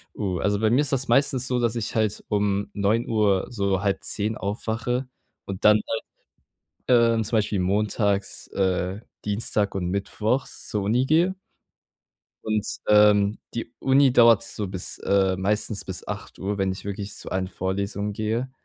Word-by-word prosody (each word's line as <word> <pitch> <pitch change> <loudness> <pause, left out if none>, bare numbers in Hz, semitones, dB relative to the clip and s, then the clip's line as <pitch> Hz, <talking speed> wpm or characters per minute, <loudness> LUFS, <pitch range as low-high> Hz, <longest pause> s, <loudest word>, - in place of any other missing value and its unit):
Oh, 95 -4 -2
also, 100 0 +1
bei 110 -1 +2
mir 130 +5 +4
ist 145 -1 0
das 135 0 0
meistens 130 0 +2
so, 125 -1 0
dass 120 -1 0
ich 115 -1 -3
halt 110 -2 0
um 100 -1 0
9:00,, 105 -1 +1
so 100 -4 0
9:30 105 +1 -1
aufwache 115 +5 -2 0.4
und 95 -1 -6
dann 105 0 +7
halt, 115 - -2 0.9
ähm, 115 -2 +4
zum 110 +2 0
Beispiel 105 -2 0
montags, 100 +1 0
äh, 95 0 -1 0.2
Dienstag 105 -1 -1
und 90 -2 -2
mittwochs 105 +6 -2
zur 105 -2 -2
Uni 120 +6 +2
gehe. 170 +6 +3 1.1
Und, 110 -1 -1 0.2
ähm, 105 -1 +5 0.2
die 115 0 -5
Uni 135 -1 +4
dauert 115 -1 +6
so 105 -3 -4
bis 95 -1 -5
äh, 95 -1 +2
meistens 105 +1 0
bis 95 -1 -7
8:00, 100 +2 -5
wenn 95 -1 0
ich 95 - -8
wirklich 100 0 -5
zu - - -8
allen 95 0 -1
Vorlesung 100 +2 -3
gehe, 115 +4 -2
105 Hz, 155 wpm, -24 LUFS, 100-115 Hz, 1.1 s, dann